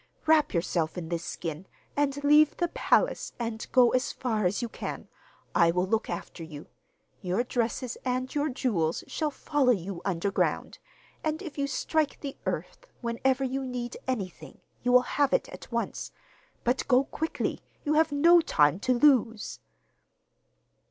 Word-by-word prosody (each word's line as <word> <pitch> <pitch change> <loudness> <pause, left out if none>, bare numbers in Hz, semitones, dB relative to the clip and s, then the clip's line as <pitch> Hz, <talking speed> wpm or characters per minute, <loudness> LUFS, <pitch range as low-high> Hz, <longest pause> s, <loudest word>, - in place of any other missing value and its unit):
Wrap 310 -1 +4
yourself 170 -1 -1
in 165 -2 -5
this 170 -1 -2
skin, 165 +1 -5 0.3
and 285 0 0
leave 300 +1 +5
the 345 -1 0
palace - - +1
and 230 -2 -4
go 250 -2 +6
as 255 0 +1
far 220 -6 0
as 185 - -1
you - - -1
can. - - -6 0.5
I 170 -1 +5
will 180 +2 +1
look 220 +3 0
after 170 - -6
you. 155 -2 -9 0.6
Your 185 +6 0
dresses 240 0 -2
and 255 0 -2
your 295 +1 0
jewels 195 - 0
shall 310 -2 -2
follow 290 -2 0
you 190 -4 -2
underground, 195 +1 -1 0.4
and 310 0 -1
if 320 -6 -7
you 280 - +1
strike 300 +2 0
the 280 -2 -5
earth - - -4
whenever 255 +3 0
you 265 +1 -2
need 250 -2 -4
anything, 185 - -4 0.2
you 245 - +1
will 250 0 +7
have 285 +1 +1
it - - +2
at - - -11
once. - - -3 0.5
But 245 +2 0
go 255 0 +5
quickly: 320 +3 -3 0.2
you 300 - +2
have 315 0 +3
no 335 +5 +6
time 150 - +3
to 255 +5 +1
lose. 240 -6 +3
250 Hz, 160 wpm, -28 LUFS, 190-285 Hz, 0.6 s, will